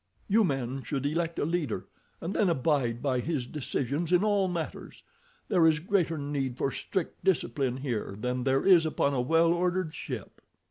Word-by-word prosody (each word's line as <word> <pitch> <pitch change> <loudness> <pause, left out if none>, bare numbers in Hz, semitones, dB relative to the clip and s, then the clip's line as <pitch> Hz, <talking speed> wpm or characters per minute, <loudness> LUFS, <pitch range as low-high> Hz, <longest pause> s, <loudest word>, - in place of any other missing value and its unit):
You 220 +3 +4
men 135 - -1
should 135 0 -3
elect 165 +3 -1
a - - 0
leader, 165 -6 -2 0.4
and 170 +4 -3
then 200 - +2
abide 135 -6 +1
by 130 -3 +1
his 140 -1 -2
decisions 145 +4 -2
in 180 +2 +4
all 205 -2 +2
matters. 170 -3 -5 0.4
There 175 -4 +4
is 160 -1 +4
greater 170 -1 0
need 140 -3 -2
for 135 - 0
strict 185 +5 -4
discipline 140 -8 +1
here 120 -7 -3
than 125 +2 -2
there 135 +1 +1
is 175 -4 +6
upon 140 -2 +1
a 130 - +1
well 165 +5 +3
ordered 180 -1 0
ship." - - -7
155 Hz, 175 wpm, -29 LUFS, 135-175 Hz, 0.4 s, is